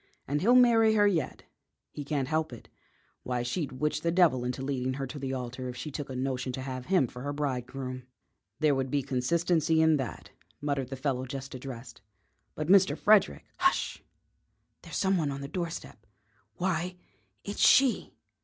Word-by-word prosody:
And 145 +2 0
he'll 235 +7 +5
marry 225 -3 +6
her 205 -1 +5
yet; 180 -6 0 0.5
he 145 - -6
can't 140 -2 -1
help 155 0 0
it. 120 - -11 0.5
Why, 125 -1 -2
she'd 135 +2 -3
witch 150 +4 -1
the 170 - 0
devil 165 -8 +3
into 125 +1 -3
leading 130 -1 -2
her 135 0 -3
to 145 +3 -7
the 135 -1 -3
altar 130 0 -4
if 125 - -7
she 140 +5 -5
took 145 0 -5
a 130 - -5
notion 130 0 -2
to 130 - -4
have 130 -1 -6
him 185 -8 +3
for 125 +1 -9
her 145 +2 -3
bridegroom." 130 -2 -4 0.5
"There 155 -2 +3
would 135 -1 -1
be 140 0 0
consistency 160 +5 +1
in 160 -1 +5
that," 130 -4 -6 0.3
muttered 140 -3 -2
the 135 - -4
fellow 130 -1 -2
just 135 +1 -6
addressed. 125 -4 -8 0.5
"But 155 - -3
Mr. 190 +1 +5
Frederick 210 -2 +3
" - - -37
"Hush! 360 0 +1 0.8
There's - - -6
some 190 -1 +2
one 155 -4 0
on 140 0 -4
the 140 - -5
doorstep. 165 - -6 0.5
Why, 180 0 -1 0.5
it's 205 - -4
she!" 260 -3 +4
140 Hz, 180 wpm, -29 LUFS, 130-170 Hz, 0.8 s, marry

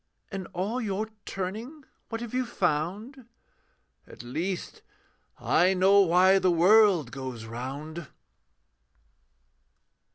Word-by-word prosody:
'In 195 -3 -5
all 205 +8 -3
your 215 0 -3 0.2
turning, 220 +11 -5 0.3
what 225 0 -5
have 240 -1 -7
you 255 0 +1
found?' 210 - -3 0.8
'At - - -12
least, 170 +10 -4 0.6
I 185 +3 +2
know 195 +2 +5
why 185 +1 +5
the 185 -1 +2
world 180 - +4
goes 130 -4 -7
round.' 140 +7 -7
185 Hz, 100 wpm, -27 LUFS, 160-215 Hz, 0.8 s, know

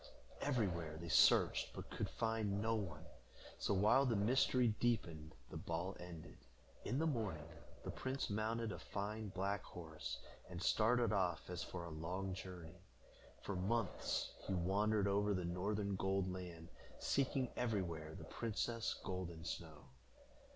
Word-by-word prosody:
Everywhere 90 - 0
they 85 +1 -6
searched, - - +5
but - - -7
could - - -1
find 110 -3 0
no 110 +2 +2
one, 85 -7 -3 0.5
so, 100 - +2
while 105 +8 +6
the 115 - +3
mystery 120 +3 +4
deepened, 85 -10 0 0.2
the - - -4
ball 85 +3 -2
ended. 85 -2 -9 0.4
In 125 - 0
the 160 - +2
morning, 105 - -1 0.4
the - - -3
prince 130 +1 -2
mounted 110 +2 0
a - - -5
fine 105 +2 -3
black 100 +1 -1
horse, 80 -3 -6 0.3
and 90 -1 -5
started 115 +4 +4
off 90 -5 +1
as 90 - -3
for 90 -2 -5
a 85 - -6
long 90 +5 -2
journey. 90 -3 -8 0.6
For 100 - -2
months 100 +3 0
he 95 - +1
wandered 100 +3 +3
over 100 +1 +3
the 90 -1 -1
northern 100 +3 0
Gold 95 0 +1
Land, 85 -3 -7 0.3
seeking 135 -2 +1
everywhere 85 -9 -1
the - - -7
princess 115 0 -1
Golden 85 -3 -4
Snow. 80 -3 -5
95 Hz, 145 wpm, -40 LUFS, 85-110 Hz, 0.6 s, while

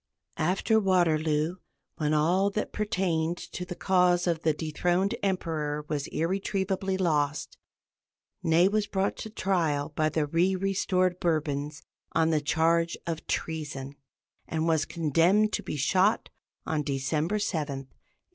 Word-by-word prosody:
After 190 +7 +2
Waterloo, 165 -4 +2 0.4
when 150 -1 0
all 175 +6 +3
that 210 +1 -3
pertained 180 -6 0
to 180 - -7
the 180 - -6
cause 180 -2 +3
of 170 -2 0
the 160 - +3
dethroned 175 +6 0
Emperor 155 -6 -2
was 145 -2 -2
irretrievably 190 +2 -1
lost, 150 -5 0 0.8
Ney 165 +3 +4
was 210 +1 0
brought 195 0 0
to 220 - -6
trial 165 -8 0
by 155 0 +2
the 155 0 0
re 170 +5 +2
restored 185 -1 0
Bourbons 150 -3 -1 0.3
on 165 0 +3
the 155 -2 +2
charge 165 +3 +2
of 165 -2 -4
treason, 145 -4 -3 0.5
and 160 0 -1
was 160 -2 +2
condemned 170 +7 +2
to - - 0
be - - -5
shot 185 - +2 0.3
on 155 -1 0
December 150 +7 -1
7, 185 -6 -1 0.3
1815. - - -35
165 Hz, 135 wpm, -28 LUFS, 155-190 Hz, 0.8 s, Ney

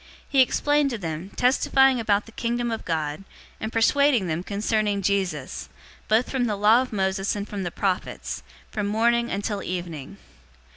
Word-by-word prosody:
He 275 -2 +4
explained 290 +2 +2
to 240 - -3
them, 165 -1 -5
testifying 265 +1 +4
about 210 -2 +1
the 225 - -14
Kingdom 235 +1 -2
of 225 - -4
God, 155 0 -2 0.4
and 220 - -4
persuading 250 0 +3
them 165 0 -2
concerning 205 +1 0
Jesus, 180 - -1 0.4
both 220 +3 +3
from 260 -2 0
the 215 -3 0
law 215 +4 +5
of 260 - -5
Moses 195 -1 0
and 205 0 -4
from 205 -2 -5
the 175 - -2
prophets, 185 +1 -2 0.3
from 210 -1 -2
morning 235 +3 +2
until 200 +1 -2
evening. 175 -2 -5
210 Hz, 160 wpm, -25 LUFS, 190-235 Hz, 0.4 s, law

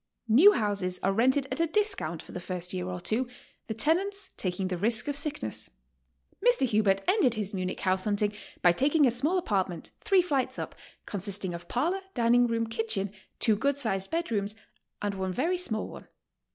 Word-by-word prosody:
New 300 - +8
houses 195 -4 -1
are 195 - +2
rented 260 +6 +3
at - - -2
a 335 - +3
discount 310 - 0
for - - -13
the - - -5
first 180 0 -4
year 180 -1 -2
t)r 180 -1 -4
two, 225 +8 -1 0.4
the 220 - -2
tenants 380 - 0
taking 185 0 -2
the 185 - -2
risk 220 - 0
of 290 - -1
sickness. 285 - -2 0.7
Mr. 485 - +4
Hubert 210 -4 +2
ended 365 - +3
his 210 -1 -3
Munich 185 -1 -3
house 185 0 +1
hunting 210 0 +1 0.3
by 175 - +7
taking 285 - +3
a 250 - +4
small 290 +10 +1
apartment, 190 - -1
three 390 -4 +3
flights 280 -7 -1
up, - - -5 0.3
consisting 195 -2 -2
of 170 0 -8
parlor, 340 +10 0
dining 240 0 +4
room, 230 -1 0
kitchen, 220 -3 -1 0.3
two 220 - +3
good 280 +6 0
sized 195 -8 0
bed 335 -3 -2
rooms, 205 -1 -1 0.5
and 205 -1 0
one 190 -1 -3
very 340 - 0
small 220 -11 -1
one. - - -11
220 Hz, 185 wpm, -28 LUFS, 190-285 Hz, 0.7 s, New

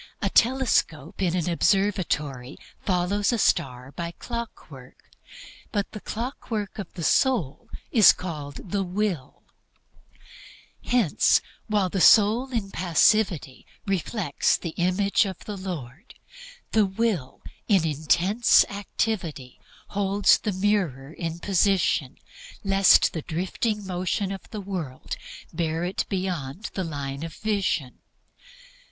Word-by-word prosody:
A - - -1
telescope 225 - +1
in 180 -2 +1
an 175 -2 -1
observatory 165 -8 0 0.3
follows 195 +3 +1
a 240 - 0
star 125 - 0
by 170 +4 -4
clockwork, 170 - -9 0.6
but 205 -2 -2
the 215 - -7
clockwork 220 -3 -5
of 195 - -6
the 170 - -5
soul 175 - +1 0.2
is 220 -6 +8
called 155 -1 -7
the 200 - +1
Will. 185 -7 -3 1.4
Hence, 240 -10 +3 0.3
while 205 -4 +1
the 190 0 -1
soul 225 +7 +5
in 215 -5 -2
passivity 175 - +1 0.2
reflects 195 -4 0
the 170 - -5
Image 185 +5 +1
of 190 -3 -8
the 210 - -5
Lord, 175 - -7 0.6
the 215 -2 +3
Will 190 - -2 0.2
in 190 -6 +3
intense 170 - +3
activity 190 - -3 0.3
holds 200 -1 +3
the 210 - -2
mirror 180 -8 -1
in 165 -1 -4
position 185 -7 +1 0.5
lest 195 -1 +5
the 160 - -3
drifting 190 +6 -2
motion 185 +2 -2
of 195 -2 -8
the 215 - -6
world 175 -10 -5 0.4
bear 165 0 -1
it 180 +2 -2
beyond 185 - -3
the 190 - -2
line 140 -4 -5
of 165 -1 -6
vision. 195 -11 -1
185 Hz, 115 wpm, -25 LUFS, 160-205 Hz, 1.4 s, is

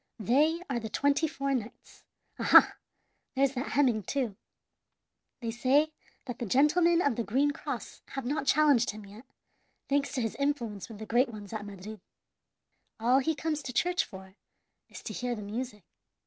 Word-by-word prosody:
They 295 - +2
are 260 -3 -1
the 220 -1 -6
twenty 285 +6 +2
four 275 -2 -2
knights. 235 -3 -6 0.4
Aha! - - +7 0.6
there's 275 0 +2
that 255 0 -4
Heming, 250 -6 +3
too. 235 0 -2 1.1
They 230 -1 -2
say 275 +6 +2 0.3
that 245 -3 -6
the 240 - -2
gentlemen 335 - +4
of 280 -5 +1
the 235 - 0
green 270 +8 +2
cross 300 - -6
have 270 -2 -4
not 285 +2 -2
challenged 285 -6 +4
him 210 0 -6
yet, 210 +6 -13 0.6
thanks 280 -1 +1
to 255 - 0
his 225 -2 -1
influence 240 -9 -2
with 220 - -9
the 220 - -7
great 240 +4 +2
ones 210 -2 -9
at 215 -2 -4
Madrid. 200 +1 -9 1.0
All 245 +4 +4
he 315 +4 0
comes 305 0 -2
to 250 - -6
church 355 +7 +2
for 190 0 -12 0.6
is - - -11
to - - -5
hear 245 -1 -2
the 210 - -7
music. 210 0 -5
250 Hz, 170 wpm, -29 LUFS, 220-285 Hz, 1.1 s, Aha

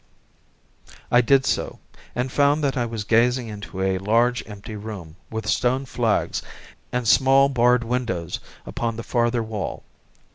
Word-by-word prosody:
I 120 - +6
did 135 +2 +4
so, - - -1 0.4
and 125 +1 -1
found 145 +2 +3
that 140 -2 +1
I 120 -2 0
was 115 -2 -4
gazing 120 +3 +2
into 100 -2 -6
a 95 -1 +1
large, 115 +5 +2
empty 105 +1 -8
room, 100 -7 -8
with 110 -2 -5
stone 130 +5 +1
flags, 120 -4 0 0.5
and 125 -2 -1
small, 135 +3 +5
barred 125 -2 +3
windows 115 -8 -2 0.3
upon 115 -1 -3
the 115 - -6
farther 120 -1 +1
wall. 110 -2 -5
120 Hz, 145 wpm, -23 LUFS, 110-125 Hz, 0.5 s, I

